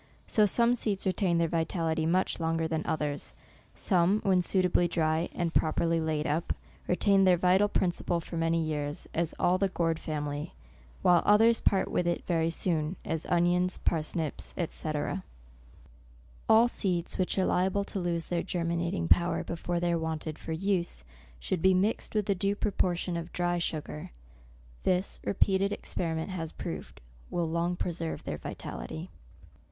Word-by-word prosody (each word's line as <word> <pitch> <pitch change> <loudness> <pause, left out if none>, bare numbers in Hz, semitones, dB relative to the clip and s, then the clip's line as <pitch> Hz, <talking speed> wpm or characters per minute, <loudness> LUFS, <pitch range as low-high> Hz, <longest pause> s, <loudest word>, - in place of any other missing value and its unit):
So 215 -1 +3
some 235 +4 +3
seeds 210 -5 -1
retain 185 -2 +1
their 170 0 +2
vitality 160 -1 0
much 185 +3 +1
longer 165 0 0
than 160 0 -2
others; 150 -2 -2 0.4
some, 185 +2 +3
when 185 -2 +3
suitably 180 -1 +2
dry, 160 0 0
and 170 -2 -2
properly 165 +1 +2
laid 155 -1 -1
up, 160 +2 0 0.3
retain 195 +2 +4
their 185 -2 +5
vital 185 +3 +4
principle 175 -3 0
for 170 - -8
many 165 0 +1
years, 150 -2 -3
as 165 -1 -1
all 180 +1 +2
the 195 - +3
gourd 165 -3 0
family; 150 0 -4 0.5
while 175 -1 +6
others 225 +3 +5
part 195 - +2
with 175 - 0
it 175 - -1
very 165 -2 +1
soon, 165 -1 0
as 160 - -2
onions, 175 +1 +2
parsnips, 160 -1 -2
&c. 155 - -3 1.6
All 225 +2 +7
seeds 180 -7 -2
which 185 - 0
are 190 - +3
liable 190 +2 +1
to 200 - -5
lose 170 -2 -1
their 175 -1 -1
germinating 170 - -1
power 170 - +3
before 170 +1 -3
they 175 0 +1
are 170 - +1
wanted 160 -1 -4
for - - -7
use, 175 - -1 0.4
should 170 - -2
be 190 +1 +5
mixed 205 +4 0
with 210 -2 +1
a 200 - +3
due 195 +2 0
propor 190 -4 0
tion 175 0 -2
of 170 +1 -6
dry 175 0 0
sugar. 150 - -3 0.7
This, 185 +1 0
repeated 195 0 +2
experi 170 -5 -2
ment 160 +4 -3
has 165 -4 -4
proved, - - -7 0.3
will 170 -1 -1
long 170 +2 0
preserve 170 -2 -3
their - - -4
vitality. - - -7
170 Hz, 160 wpm, -29 LUFS, 160-185 Hz, 1.6 s, All